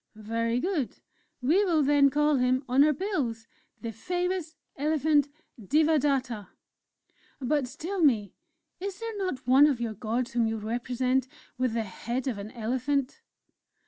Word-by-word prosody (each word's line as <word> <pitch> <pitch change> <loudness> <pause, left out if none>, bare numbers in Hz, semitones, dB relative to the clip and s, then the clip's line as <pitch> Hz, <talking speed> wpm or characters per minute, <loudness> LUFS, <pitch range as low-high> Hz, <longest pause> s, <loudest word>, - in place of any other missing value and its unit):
'" - - -49
"Very 230 +2 -1
good! 320 - -2 0.5
We 335 +11 +4
will 330 -6 +2
then 285 0 +5
call 295 +1 +2
him 255 +1 +2
on 260 +3 +5
our 305 - +5
bills, 275 - -2 0.4
'The 230 - -4
Famous 355 - -2 0.2
Elephant 295 0 +2 0.3
Devadatta'.... 275 -5 +1 0.9
But, 270 0 -1
tell 375 +5 -3
me, 220 - +3 0.5
is 390 +1 -4
there 455 -1 -5
not 370 -11 -3
one 270 +4 +7
of 275 -5 0
your 230 -2 -2
gods 230 +3 -2
whom 235 -1 +1
you 225 0 -2
represent 250 +4 -1 0.3
with 255 -2 -1
the 230 - 0
head 235 +6 -4
of 230 -6 -2
an 200 +1 -6
elephant?" 255 +4 -2
260 Hz, 145 wpm, -28 LUFS, 235-305 Hz, 0.9 s, one